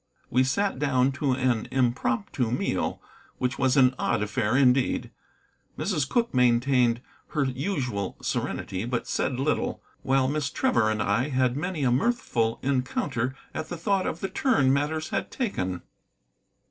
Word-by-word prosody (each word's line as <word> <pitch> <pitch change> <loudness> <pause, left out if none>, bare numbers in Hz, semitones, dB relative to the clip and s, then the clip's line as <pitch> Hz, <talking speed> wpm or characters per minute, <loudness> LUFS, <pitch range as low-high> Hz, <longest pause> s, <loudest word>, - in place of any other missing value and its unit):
We 130 +2 +4
sat 195 +4 0
down 135 -2 +2
to 140 -3 +2
an 125 -3 0
impromptu 135 - 0
meal, 125 - -1 0.4
which 125 0 -2
was 130 0 +2
an 130 -1 +6
odd 110 -3 +1
affair 110 +3 0
indeed. 130 -1 +2 0.7
Mrs. 155 -9 -1
Cooke 235 -1 +1
maintained 125 -1 +3 0.3
her 150 - +3
usual 130 - -2
serenity, 95 +1 -3
but 120 0 -2
said 130 -1 -1
little, 145 +3 -1 0.2
while 135 0 +2
Miss 145 0 -1
Trevor 255 - +2
and 110 0 0
I 120 +8 +1
had 130 -2 +1
many 165 0 -2
a 125 - +3
mirthful 125 - +1
encounter 130 -1 -1 0.2
at 155 0 -5
the 175 - -4
thought 190 +3 0
of 165 - -4
the 195 - -2
turn 140 - +2
matters 155 +3 -1
had - - -2
taken. 95 - -3
130 Hz, 145 wpm, -26 LUFS, 120-150 Hz, 0.7 s, an